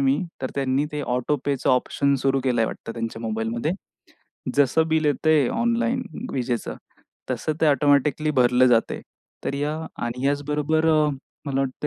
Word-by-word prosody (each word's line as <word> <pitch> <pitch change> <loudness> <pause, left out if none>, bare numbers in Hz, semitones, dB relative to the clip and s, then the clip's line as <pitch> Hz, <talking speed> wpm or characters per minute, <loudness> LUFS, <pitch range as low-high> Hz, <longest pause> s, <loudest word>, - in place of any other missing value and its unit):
मी 135 +1 +3 0.2
तर 130 - -2
त्यांनी 135 +1 +1
ते 150 - -2
ऑटोपेचं 135 +2 0
ऑप्शन 140 +2 +2
सुरू 135 0 +2
केलंय 120 -3 +2
वाटतं 115 - -6
त्यांच्या 115 -1 -5
मोबाईलमध्ये. 115 +6 -2 0.8
जसं 145 +3 +3
बिल 160 0 +1
येतंय 150 -1 +3
ऑनलाईन 235 +2 +1 0.3
विजेचं 125 -2 -2 0.6
तसं 155 - -1
ते 160 - +4
ऑटोमॅटिकली 145 +1 +3
भरलं 125 -2 +4
जातंय. 120 -2 +2 0.4
तर - - -1
या 145 +2 -1 0.3
आणि 120 +2 -4
ह्याच 145 +1 +1
बरोबर 150 +2 +1
अ, 155 -1 +4 0.4
मला 135 -1 0
वाटत 135 +2 -2
140 Hz, 145 wpm, -24 LUFS, 125-150 Hz, 0.8 s, ते